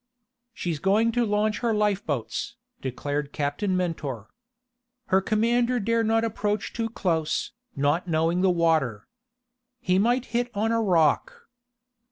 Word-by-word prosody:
"She's 170 Hz, -8 st, -3 dB
going 210 Hz, +6 st, +3 dB
to 240 Hz, +1 st, +1 dB
launch 210 Hz, +1 st, +1 dB
her 230 Hz, -2 st, 0 dB
lifeboats," 200 Hz, -, -1 dB, 0.3 s
declared 145 Hz, +2 st, -3 dB
Captain 150 Hz, +8 st, -1 dB
Mentor. 145 Hz, -, -3 dB, 0.8 s
"Her 190 Hz, +1 st, +4 dB
commander 235 Hz, +4 st, +1 dB
dare 230 Hz, +2 st, +1 dB
not 225 Hz, +1 st, +2 dB
approach 210 Hz, -2 st, -2 dB
too 230 Hz, -1 st, -2 dB
close, 165 Hz, -8 st, -1 dB, 0.2 s
not 145 Hz, +6 st, +1 dB
knowing 165 Hz, +2 st, +1 dB
the 190 Hz, -, +4 dB
water. 160 Hz, -11 st, +1 dB, 0.7 s
He 185 Hz, -3 st, +1 dB
might 240 Hz, +4 st, +2 dB
hit 240 Hz, +1 st, +1 dB
on 220 Hz, +2 st, +1 dB
a 230 Hz, 0 st, +2 dB
rock." 210 Hz, -, +1 dB
195 Hz, 130 wpm, -26 LUFS, 160-225 Hz, 0.8 s, Her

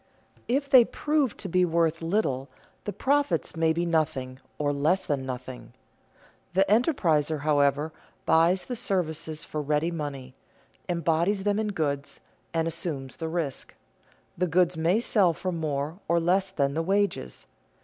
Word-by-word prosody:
If 275 Hz, +4 st, 0 dB
they 260 Hz, -3 st, +8 dB
prove 295 Hz, 0 st, 0 dB
to 195 Hz, -, -5 dB
be 180 Hz, 0 st, +2 dB
worth 165 Hz, -1 st, +1 dB
little, 165 Hz, -7 st, -1 dB, 0.4 s
the 205 Hz, -, -2 dB
profits 265 Hz, -, 0 dB
may 160 Hz, 0 st, +2 dB
be 170 Hz, +2 st, 0 dB
nothing 135 Hz, -6 st, -1 dB, 0.2 s
or 145 Hz, -1 st, 0 dB
less 155 Hz, +7 st, +1 dB
than 135 Hz, -3 st, -2 dB
nothing. 125 Hz, 0 st, -7 dB, 0.8 s
The 190 Hz, +1 st, +5 dB
enterpriser, 165 Hz, -, +2 dB
however, 145 Hz, +1 st, +2 dB, 0.3 s
buys 170 Hz, +3 st, +3 dB
the 250 Hz, -, -4 dB
services 165 Hz, -8 st, -2 dB
for 155 Hz, -, -4 dB
ready 150 Hz, +3 st, 0 dB
money, 140 Hz, -5 st, -5 dB, 0.6 s
embodies 170 Hz, +3 st, +1 dB
them 205 Hz, +1 st, +1 dB
in 220 Hz, -, 0 dB
goods, 145 Hz, -8 st, -2 dB, 0.3 s
and 165 Hz, -1 st, 0 dB
assumes 150 Hz, -6 st, -4 dB
the 160 Hz, -, -4 dB
risk; 160 Hz, -5 st, -3 dB, 0.6 s
the 180 Hz, +1 st, 0 dB
goods 175 Hz, +1 st, +2 dB
may 165 Hz, +6 st, +2 dB
sell 200 Hz, -7 st, +3 dB
for 185 Hz, +3 st, -3 dB
more 155 Hz, 0 st, -3 dB
or 170 Hz, 0 st, +3 dB
less 185 Hz, +3 st, +2 dB
than 140 Hz, -7 st, 0 dB
the 160 Hz, -, 0 dB
wages. 195 Hz, -, -1 dB
165 Hz, 150 wpm, -27 LUFS, 150-190 Hz, 0.8 s, they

